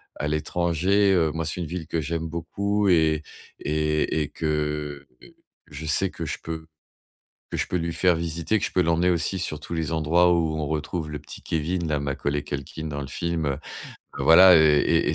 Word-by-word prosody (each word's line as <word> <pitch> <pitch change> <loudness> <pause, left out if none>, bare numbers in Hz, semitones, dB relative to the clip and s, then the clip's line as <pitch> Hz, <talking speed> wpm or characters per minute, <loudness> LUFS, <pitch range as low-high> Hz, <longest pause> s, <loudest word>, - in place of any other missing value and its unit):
à 75 - -2
l'étranger» 90 +5 +1
heu, 80 -4 +2
moi 80 0 -2
c'est 90 - -4
une 85 - -3
ville 85 0 -5
que 85 - -1
j'aime 80 +2 -3
beaucoup 100 +5 -1
et 80 -3 +3 0.4
et 75 +1 0
et 75 - -6
que 75 -2 -3 0.7
je 75 +2 -7
sais 85 +5 +2
que 80 - -6
je - - -3
peux 80 -1 -6 0.9
que - - -3
je - - -1
peux - - -2
lui 85 0 -2
faire 90 0 +3
visiter 85 +5 -1
que 105 - -1
je - - -5
peux 90 - +3
l'emmener 85 +1 +2
aussi 85 +2 0
sur 75 -4 -3
tous 75 - -9
les 80 0 -2
endroits 80 +3 +3
où 80 -2 +1
on 75 - -2
retrouve 80 +1 -3
le 75 - -4
petit 75 0 -11
Kevin, 85 +2 -2
là, 75 -1 0
Macaulay 70 +1 -2
Culkin 70 +2 -6
dans 70 -1 -4
le 70 - -5
film, 85 +2 -2
heu, 70 -1 -1 0.6
voilà, 90 +3 +8
heu, - - +6
et 75 -2 +3
et - - -1
80 Hz, 200 wpm, -25 LUFS, 75-85 Hz, 0.9 s, voilà